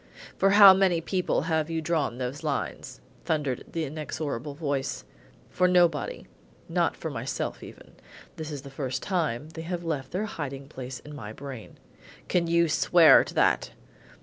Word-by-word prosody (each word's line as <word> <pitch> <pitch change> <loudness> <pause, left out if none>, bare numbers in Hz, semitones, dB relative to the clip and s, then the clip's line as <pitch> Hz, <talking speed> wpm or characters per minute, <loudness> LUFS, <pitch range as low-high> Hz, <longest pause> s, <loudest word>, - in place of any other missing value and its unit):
"For 195 - +3
how 200 -1 +9
many 190 -3 +2
people 180 +2 -1
have 160 -1 0
you 165 -1 -1
drawn 155 -6 -1
those 130 +3 -4
lines?" 135 - -4 0.2
thundered 145 -6 -1
the 165 -1 -2
inexorable 145 -2 -5
voice. 140 -3 -3 0.5
"For 180 - +2
nobody; 175 -5 +2 0.4
not - - 0
for - - -5
myself - - -4
even. - - -12 0.4
This 155 -1 -6
is 145 -2 -6
the 140 - -10
first 135 -1 -4
time 155 -7 -1
they 160 0 -8
have 175 +1 -4
left 145 -6 -3
their 190 +5 -2
hiding 140 -8 -6
place 130 -2 -8
in 150 - -11
my 110 -6 -8
brain." 135 -3 -9 0.5
"Can 175 -2 +1
you 170 0 +3
swear 165 +1 +6
to - - -9
that?" - - +2
155 Hz, 160 wpm, -27 LUFS, 135-170 Hz, 0.5 s, how